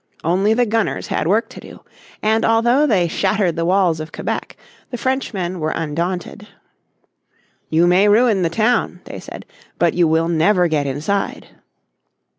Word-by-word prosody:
Only 195 +6 +2
the 245 +1 +2
gunners 225 -1 -1
had - - -1
work 215 +6 +2
to - - -11
do. - - -13 0.4
And 220 +1 +2
although 240 +6 +3
they 190 -9 +2
shattered 185 0 0
the 165 0 -1
walls 180 -3 +2
of 155 0 -7
Quebec - - -5 0.3
the 245 - -5
Frenchmen 205 -9 -2
were 155 0 -1
undaunted. 175 +6 -4 1.2
"You 165 +2 +3
may 180 +4 +4
ruin 215 -2 +3
the 170 - +1
town," 220 +7 0
they - - -9
said, - - -10 0.3
"but - - +2
you 175 -2 +2
will 160 +1 +1
never 175 +2 +2
get 150 -3 -1
inside." 155 +9 -3
185 Hz, 155 wpm, -19 LUFS, 165-220 Hz, 1.2 s, may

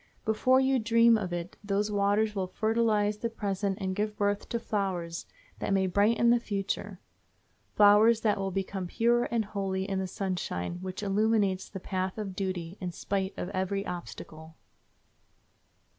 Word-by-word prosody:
Before 255 +4 +3
you 265 0 +3
dream 230 +1 +5
of 195 -5 -2
it 175 0 -5
those 205 +1 0
waters 205 +1 +2
will 190 -3 -2
fertilize 215 0 +1
the 230 - -2
present 200 -3 -2
and 190 -1 -2
give 210 +1 -2
birth 205 0 0
to 235 - -1
flowers 190 -7 -3 0.3
that - - -1
may 190 -1 +3
brighten 215 +5 +3
the 240 - +4
future—flowers 205 +1 +1
that 210 -3 +1
will 195 0 -1
become 190 0 -3
pure 240 +5 +2
and 230 -2 -1
holy 195 -2 -2
in 195 -1 -1
the 190 - -2
sunshine 180 - -3
which 185 +2 -5
illumes 200 -1 +1
the 190 - -7
path 185 +1 -3
of 200 -3 -5
duty, 185 -2 -4
in 180 -1 -3
spite 190 +2 -3
of 180 - -4
every 195 +1 -2
obstacle. 160 -2 -8
200 Hz, 155 wpm, -29 LUFS, 190-215 Hz, 0.3 s, dream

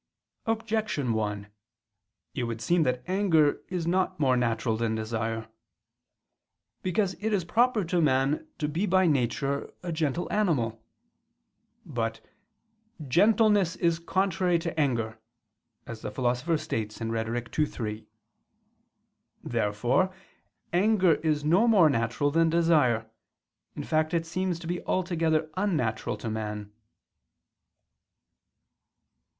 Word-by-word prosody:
Objection 220 - -1
1: 105 -2 -2 0.9
It 125 - -2
would 115 -1 -4
seem 175 +8 +2
that 125 -4 0
anger 180 -6 +2
is 180 -3 -2
not 180 -1 0
more 130 -4 +3
natural 115 -2 0
than 110 0 -1
desire. 110 0 -3 1.3
Because 185 +1 0
it 220 +2 -1
is 195 -5 0
proper 235 +3 +2
to 175 +1 +1
man 140 +1 +1
to 150 - -1
be 170 +8 -1
by 185 +1 +4
nature 140 -1 0
a 175 - -3
gentle 160 +1 -1
animal. 120 - 0 1.0
But - - -3 0.9
"gentleness 205 - +4
is 170 -1 +1
contrary 180 0 +1
to 165 -1 -4
anger," 115 -6 0 0.7
as 115 -2 -8
the - - -4
Philosopher 125 +8 0
states 110 -9 -4
(Rhet. 115 +3 -3
ii, 150 - +5
3). 110 -4 -6 1.4
Therefore 120 - +1 0.6
anger 190 -1 +4
is 150 -1 0
no 185 +9 +4
more 190 -9 +6
natural 120 +4 0
than 165 +2 +3
desire, 155 -10 +3 0.7
in - - -5
fact 155 +1 0
it 165 -1 0
seems 180 +1 -2
to - - -9
be 175 +1 -3
altogether 160 -4 0
unnatural 155 - -1
to 115 - -5
man. 105 -1 -4
155 Hz, 115 wpm, -27 LUFS, 115-180 Hz, 1.4 s, more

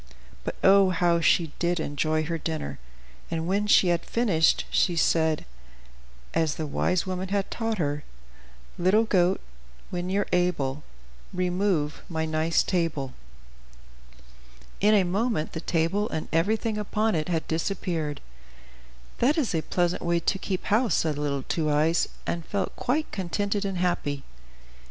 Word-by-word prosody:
But - - -4
oh, 195 0 +6
how 175 -1 +2
she 165 -1 +3
did 175 0 +1
enjoy 155 +1 0
her 165 +1 -3
dinner! 155 - -4 0.5
and 165 0 -2
when 200 +4 0
she 190 -3 +5
had 170 -1 +1
finished, 195 -9 +2
she 175 - +2
said, 160 -1 +2 0.9
as 160 -2 +1
the 160 - -3
wise 175 +4 0
woman 185 0 -3
had 200 0 -1
taught 225 -1 -2
her: 145 -3 -1 0.8
"Little 190 +5 +4
goat, 185 -4 +2 0.5
when 180 0 -3
you're 200 +1 +1
able, 150 -6 +1 0.5
Remove 180 -4 0
my 160 -2 -1
nice 160 +1 +1
table." 160 -8 -1 1.7
In 210 +2 +5
a 200 - +5
moment, 200 -1 -1
the 160 - -4
table 175 +6 0
and 160 - -3
everything 215 +6 +1
upon 215 +1 0
it 155 0 -1
had 165 -2 -1
disappeared. 160 -3 -2 1.0
"That 275 +7 +3
is 275 - 0
a 160 - +1
pleasant 175 +2 0
way 170 0 +1
to 190 +3 0
keep 185 -1 -3
house," 225 +3 +2
said 155 -3 0
little 140 -2 -1
Two 155 +1 -1
Eyes, 155 +3 +2 0.2
and 170 -1 -2
felt 200 +3 -3
quite 300 +5 -1
contented 200 +2 -1
and 195 -2 -2
happy. 160 -6 -1
175 Hz, 145 wpm, -26 LUFS, 160-195 Hz, 1.7 s, oh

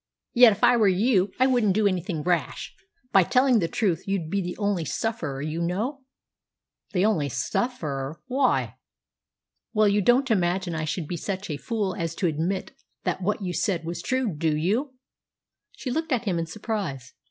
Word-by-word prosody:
Yet 240 -1 +8
if - - -10
I 245 - +6
were 215 -3 +4
you 195 0 +3
I 255 - +4
wouldn't 240 -7 +3
do 215 0 +2
anything 180 -4 -1
rash. 170 -6 -1 0.4
By 195 - +6
telling 250 +5 +3
the 170 - 0
truth 185 -4 -1
you'd 190 -5 -2
be 200 0 +1
the 175 -1 -5
only 200 -5 0
sufferer, 155 -6 -3
you 155 +2 -3
know." 215 - -2 0.9
"The 185 -1 +2
only 165 -10 +1
sufferer! 140 - -2
Why?" 260 0 +1 1.0
"Well, 215 0 +5
you 205 +1 +3
don't 245 +5 +3
imagine 180 -2 +1
I 155 -1 -2
should 155 0 -3
be 175 - -3
such 190 +1 -4
a 145 - -2
fool 200 +5 -2
as 165 -2 -3
to 190 - -2
admit 170 +4 -1 0.3
that - - -1
what 205 +2 -1
you 180 -1 -2
said 175 -4 -1
was 170 +1 -4
true, 255 -2 0
do 155 0 0
you?" 230 - 0 0.8
She 255 - -4
looked 320 +4 -2
at 245 -2 +1
him 180 -5 0
in 165 - -2
surprise. 185 - -4
190 Hz, 180 wpm, -25 LUFS, 165-225 Hz, 1.0 s, Yet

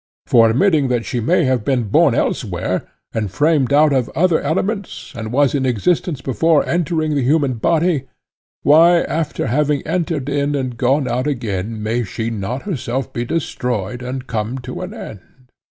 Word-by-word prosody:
For 115 -2 +5
admitting 150 - +3
that 120 -2 -1
she 120 - -2
may 170 +10 +2
have 130 -5 +1
been 130 -2 +1
born 105 - +3
elsewhere, - - -1 0.3
and 110 -3 -2
framed 145 - +2
out 150 +1 +5
of 130 -3 +1
other 170 -1 +3
elements, 190 +6 -3
and 110 -1 -5
was 140 +1 +2
in 140 -2 0
existence 135 - 0
before 155 +5 +2
entering 160 -2 0
the 140 - +1
human 140 +1 +2
body, 165 -4 +1 0.6
why 165 +4 +6
after 160 -2 -2
having 145 +3 0
entered 165 -6 -2
in 145 0 0
and 130 -3 -2
gone 130 +3 +1
out 125 +3 -1
again 110 -5 -3
may 115 +3 0
she 110 +3 -4
not 115 +5 -4
herself 135 - -3
be 120 - -2
destroyed 120 - -3
and 130 +1 -5
come 115 +1 -3
to 130 +7 -6
an 180 +1 -5
end? 125 - -11
135 Hz, 170 wpm, -19 LUFS, 120-155 Hz, 0.6 s, why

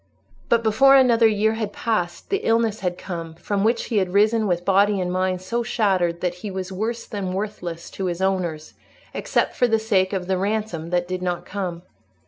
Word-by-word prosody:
But 235 -1 +3
before 270 +5 +5
another 240 -4 +5
year 220 0 +2
had 220 -2 -3
passed, 205 - -2
the 400 - +3
illness 225 - +1
had 180 -2 -2
come 165 -4 -6
from 200 +4 -2
which 230 +2 +2
he 220 - +1
had 185 -2 -2
risen 215 +1 +3
with 175 -1 -1
body 200 +1 +3
and 180 -1 -1
mind 185 0 -1
so 235 +6 -1
shattered 190 -7 0
that 180 -1 0
he 210 - -4
was 190 0 -5
worse 220 +5 -3
than 195 -4 -4
worthless 180 -4 -5
to 195 - -4
his 175 -1 -2
owners, 180 -5 -1 0.4
except - - 0
for 245 - +3
the 225 -1 +3
sake 200 -4 +1
of 190 -3 -2
the 190 0 0
ransom 200 -5 -2
that 175 0 0
did 185 0 -3
not 175 -1 -2
come. 180 -4 -4
195 Hz, 200 wpm, -23 LUFS, 180-220 Hz, 0.4 s, before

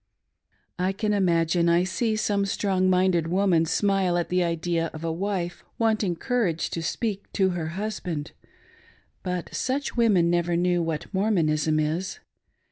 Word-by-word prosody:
I 185 +1 +1
can 210 +1 -1
imagine 170 -3 +2
I 170 +1 +4
see 215 +4 -1
some 205 -2 0
strong 190 -2 +1
minded 180 -3 +2
woman 175 -2 +2
smile 195 -1 +1
at 175 - -1
the 180 0 +2
idea 170 0 -1
of 155 - -8
a 165 - -1
wife 175 0 -3
wanting 215 -5 +1
courage 200 -6 -1
to 165 - -3
speak 200 +4 -3
to 190 -1 +2
her 170 -2 -3
hiisbandi 185 -7 -4 0.9
But 180 -2 -4
such 275 +3 -2
women 200 -8 +3
never 175 0 +1
knew 175 0 +2
what 165 +2 -4
Mprmonism 160 -6 +1
is. 160 +5 -2
180 Hz, 145 wpm, -25 LUFS, 170-200 Hz, 0.9 s, I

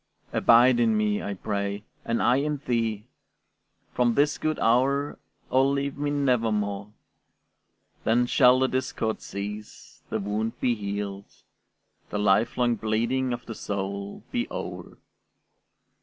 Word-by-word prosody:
Abide 120 +1 +5
in 115 -2 +3
me, 105 -1 +1
I 100 - -4
pray, 100 +1 -3 0.2
and 115 0 0
I 125 - +4
in 150 +1 0
thee; 115 -3 -1 0.9
From 120 -2 +2
this 145 +2 +2
good 155 -1 -1
hour, 135 +5 +2 0.3
O 130 +1 +4
leave 140 0 0
me 145 0 -2
nevermore; 110 -7 0 1.1
Then 120 +2 +3
shall 125 0 +5
the 130 0 +3
discord 130 -4 -2
cease, 105 +1 -8
the - - -1
wound 105 +3 -2
be 125 - +2
healed, 100 -2 -5 0.8
The - - -3
lifelong 115 +4 +2
bleeding 115 +5 0
of 120 0 -4
the 115 - -6
soul 100 -1 -5
be 245 -1 -1
o'er. - - -7
115 Hz, 125 wpm, -26 LUFS, 105-130 Hz, 1.1 s, Abide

